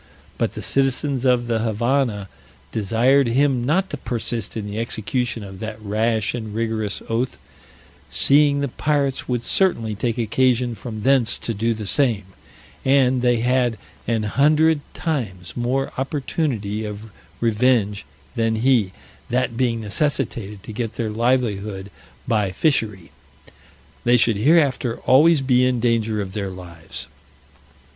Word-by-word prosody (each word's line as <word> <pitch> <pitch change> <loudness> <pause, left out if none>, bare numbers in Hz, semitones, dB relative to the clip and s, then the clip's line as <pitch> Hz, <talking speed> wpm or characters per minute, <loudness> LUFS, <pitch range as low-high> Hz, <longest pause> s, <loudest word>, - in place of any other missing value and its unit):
But - - 0
the - - -6
citizens 135 0 0
of 125 -2 +3
the 115 -1 0
Havannah 115 -1 0 0.4
desired 120 +6 +2
him 130 +1 +2
not 180 +9 +1
to 145 - -3
persist 115 -3 -3
in 105 - -4
the 105 +1 -4
execution 115 +1 -2
of 95 -1 -10
that 110 0 -6
rash 110 +1 0
and 110 -3 -5
rigorous 110 -2 -2
oath, 115 +3 -1 0.7
seeing 145 0 +4
the 140 - 0
pirates 140 0 -1
would 125 -2 -1
certainly 115 - +1
take 115 +3 -2
occasion 120 +1 +1
from 110 -1 -7
thence 130 -3 +3
to 115 - -3
do 115 +2 0
the 105 -1 -6
same, 115 -3 +1 0.6
and 130 -2 +3
they 120 -2 +2
had 125 -2 +1 0.3
an 115 -1 0
hundred 150 +6 +3
times 95 - -3
more 130 +3 -1
opportunity 130 -7 -2
of 105 +1 -7 0.3
revenge 115 -3 +2 0.3
than 115 -1 +1
he; 110 -5 +2 0.4
that 125 -1 0
being 115 -2 0
necessitated 105 -3 -2
to 110 - -8
get 115 0 -3
their 110 -2 -3
livelihood 105 -4 -1 0.4
by 105 -5 +1
fishery, 105 - 0 0.9
they 120 +1 +4
should 115 -2 +3
hereafter 135 -2 +2
always 150 +3 +5
be 125 -1 +3
in 125 -1 +2
danger 115 -2 +1
of 95 -1 -9
their 100 -2 -3
lives. 85 -3 -8
115 Hz, 135 wpm, -22 LUFS, 110-130 Hz, 0.9 s, always